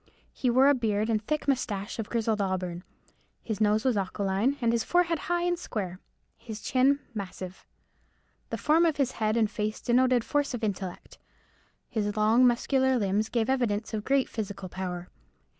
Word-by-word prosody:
He 255 - 0
wore 260 +3 +5
a 285 - +6
beard 220 -3 0
and 215 -1 +1
thick 305 +7 -2
moustache 215 -7 -1
of 220 - -4
grizzled 225 -2 0
auburn. 180 -2 -2 0.6
His 220 -2 -4
nose 215 +3 +3
was 255 -3 +3
aquiline, 200 +4 0
his 235 -4 0
forehead 345 -2 +2
high 350 0 +1
and 350 0 0
square, 185 - -4 0.4
his 220 -2 -7
chin 270 +5 +2
massive. 190 -3 -7 0.8
The - - -3
form 315 +3 +3
of 315 - 0
his 270 -3 +1
head 215 0 0
and 225 -2 +3
face 215 0 -3
denoted 250 0 +3
force 290 +1 0
of 235 - -7
intellect. 190 -3 -4 0.7
His 210 -1 -2
long, 225 +4 +5
muscular 260 +2 +2
limbs 210 0 0
gave 230 -2 0
evidence 235 -5 0
of 215 -1 -2
great 270 +2 +2
physical 200 -3 -5
power. 180 -1 -5
225 Hz, 165 wpm, -28 LUFS, 205-260 Hz, 0.8 s, a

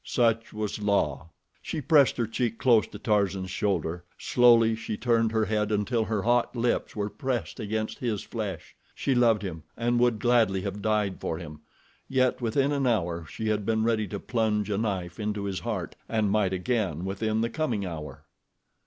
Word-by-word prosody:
Such 115 -2 +1
was 105 0 -4
La. 85 -8 0 0.3
She 160 - -4
pressed 145 -1 +4
her 120 - +1
cheek 115 0 -2
close 115 0 +4
to - - -9
Tarzan's 100 -3 0
shoulder. 90 -4 -1
Slowly 115 -2 +5
she 110 -1 -4
turned 115 -1 +2
her 110 -1 +1
head 105 0 0
until 110 +2 +1
her 105 -2 -1
hot 120 +2 +2
lips 120 0 0
were 105 -1 -1
pressed 120 - -3
against 110 +1 -3
his 115 -5 -2
flesh. 105 -5 -5 0.2
She 135 - 0
loved 115 -4 +3
him 85 -4 -5 0.2
and 120 +1 +1
would 120 -2 +3
gladly 110 -4 +3
have 100 +1 -4
died 105 -2 0
for 80 - -2
him; 75 -3 -9 0.5
yet 130 -1 +2
within 135 +5 +1
an 140 -2 +1
hour 85 -8 0
she 110 +5 -4
had 105 -1 0
been 110 +1 +1
ready 110 -2 +1
to 100 +1 -5
plunge 105 -3 0
a 100 - 0
knife 95 -5 -3
into 105 -1 -2
his 100 -2 -2
heart 105 -8 -4
and 110 -3 +1
might 105 -3 +2
again 95 -4 -1
within 110 +3 -1
the 115 - 0
coming 120 -10 -1
hour. 75 -4 -7
110 Hz, 180 wpm, -27 LUFS, 100-115 Hz, 0.5 s, Slowly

